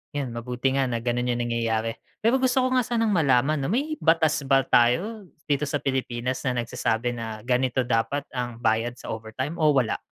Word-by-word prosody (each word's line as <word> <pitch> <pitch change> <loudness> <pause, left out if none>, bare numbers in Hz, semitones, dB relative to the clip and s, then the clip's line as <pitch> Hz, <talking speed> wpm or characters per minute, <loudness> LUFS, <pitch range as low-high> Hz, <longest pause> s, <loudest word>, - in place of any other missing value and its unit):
yun 140 -3 -2
mabuti 125 +2 -2
nga 135 - +2
na 120 -2 -2
ganun 120 0 -1
yung 120 - -2
nangyayari. 115 -1 -1 0.2
Pero 235 +4 +3
gusto 260 0 +2
ko 255 - +1
nga 250 - +2
sanang 230 -2 0
malaman 150 -5 +3
'no 140 +8 -1
may 305 +5 -1
batas 160 -1 +3
ba 135 0 +4
tayo 170 - +2 0.2
dito 145 +1 +1
sa 145 0 -2
Pilipinas 130 -1 -2
na 130 - +1
nagsasabi 115 0 -1
na 115 -2 -5
ganito 125 +2 +1
dapat 120 +3 0
ang 120 -2 -5
bayad 115 +1 +1
sa 120 - -11
overtime 115 +8 -4
o 155 -2 +4
wala? 125 -5 +1
130 Hz, 190 wpm, -25 LUFS, 120-155 Hz, 0.2 s, ba